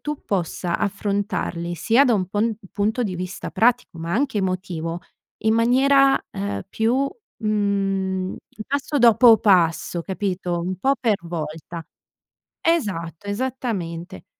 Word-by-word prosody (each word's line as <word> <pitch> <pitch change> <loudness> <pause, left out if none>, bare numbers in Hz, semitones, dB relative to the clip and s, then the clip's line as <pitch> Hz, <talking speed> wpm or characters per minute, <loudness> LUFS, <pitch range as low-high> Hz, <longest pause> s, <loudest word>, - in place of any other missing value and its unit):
tu 300 -1 -5
possa 175 -2 -1
affrontarli 200 -4 -2
sia 230 - +4
da 240 - +4
un 185 -3 0
pon 215 +2 0 0.2
punto 215 +4 0
di 190 -5 -2
vista 185 +2 -5
pratico, 235 -7 +1
ma 165 +1 -4
anche 270 -3 0
emotivo, 180 -3 -3 0.4
in 220 0 +4
maniera, 270 +4 +4
uhm, 100 0 -3
più 250 +5 +1 0.4
mhmm, 195 -3 0 0.3
passo 285 +1 -1
dopo 235 -1 +7
passo, 175 -3 +2
capito, 185 -2 -2
un 185 +2 -3
po' 270 +7 +2
per 225 -5 +2
volta. 165 0 -6 0.8
Esatto, 200 - -1
esattamente. 200 -7 -4
200 Hz, 120 wpm, -22 LUFS, 175-235 Hz, 0.8 s, dopo